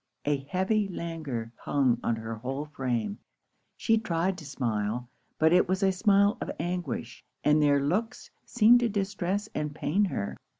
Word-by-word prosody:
A 145 Hz, 0 st, +2 dB
heavy 195 Hz, +3 st, +1 dB
languor 155 Hz, -11 st, -5 dB
hung 130 Hz, -5 st, +1 dB
on 115 Hz, -, 0 dB
her 110 Hz, 0 st, -5 dB
whole 130 Hz, +6 st, -4 dB
frame. 120 Hz, -8 st, -2 dB, 0.6 s
She 225 Hz, 0 st, +2 dB
tried 185 Hz, -3 st, 0 dB
to 155 Hz, -, -10 dB
smile; 120 Hz, -2 st, -2 dB, 0.3 s
but 160 Hz, +1 st, +4 dB
it 180 Hz, 0 st, +4 dB
was 190 Hz, +1 st, +1 dB
a 190 Hz, -, +4 dB
smile 200 Hz, +3 st, +3 dB
of -, -, -3 dB
anguish; 175 Hz, -8 st, -4 dB, 0.2 s
and 150 Hz, +1 st, +4 dB
their 145 Hz, -1 st, +4 dB
looks 210 Hz, -, -2 dB
seemed 240 Hz, +1 st, +5 dB
to 240 Hz, -1 st, +1 dB
distress 200 Hz, 0 st, -2 dB
and 150 Hz, -1 st, -3 dB
pain 175 Hz, +7 st, +1 dB
her. 100 Hz, -, -3 dB
165 Hz, 160 wpm, -28 LUFS, 130-195 Hz, 0.6 s, seemed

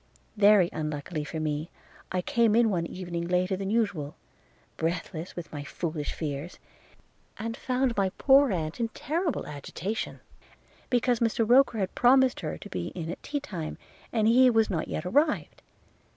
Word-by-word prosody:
Very 205 Hz, -3 st, +6 dB
unluckily 150 Hz, +1 st, -3 dB
for 160 Hz, +2 st, -5 dB
me, 155 Hz, +1 st, -2 dB, 0.4 s
I 185 Hz, -1 st, -1 dB
came 230 Hz, 0 st, +3 dB
in 230 Hz, -2 st, +4 dB
one 170 Hz, -3 st, -1 dB
evening 175 Hz, -2 st, -5 dB
later 180 Hz, +2 st, +1 dB
than 195 Hz, +1 st, -4 dB
usual, 200 Hz, -10 st, -1 dB, 0.6 s
breathless 165 Hz, +1 st, -3 dB
with 175 Hz, -1 st, -7 dB
my 145 Hz, -1 st, -5 dB
foolish 155 Hz, 0 st, -4 dB
fears, 150 Hz, +2 st, -5 dB, 0.8 s
and 225 Hz, +1 st, -4 dB
found 255 Hz, -1 st, 0 dB
my 195 Hz, -2 st, +2 dB
poor 275 Hz, -2 st, +5 dB
aunt 160 Hz, -1 st, -3 dB
in 230 Hz, -, +1 dB
terrible 325 Hz, +1 st, -1 dB
agitation, 160 Hz, +8 st, -5 dB, 0.7 s
because 245 Hz, -1 st, +2 dB
Mr 230 Hz, -1 st, +1 dB
Roker 250 Hz, -1 st, +5 dB
had 190 Hz, -2 st, -1 dB
promised 260 Hz, +1 st, +4 dB
her 155 Hz, -, -4 dB
to -, -, -10 dB
be 90 Hz, -2 st, -3 dB
in 165 Hz, -2 st, -4 dB
at -, -, -8 dB
tea 290 Hz, -, -3 dB
time, 175 Hz, -, -6 dB, 0.3 s
and 220 Hz, -2 st, +2 dB
he 250 Hz, +3 st, +6 dB
was 225 Hz, -3 st, +3 dB
not 165 Hz, -4 st, -1 dB
yet 155 Hz, -, -4 dB
arrived. 290 Hz, -, +1 dB
190 Hz, 160 wpm, -28 LUFS, 160-235 Hz, 0.8 s, Very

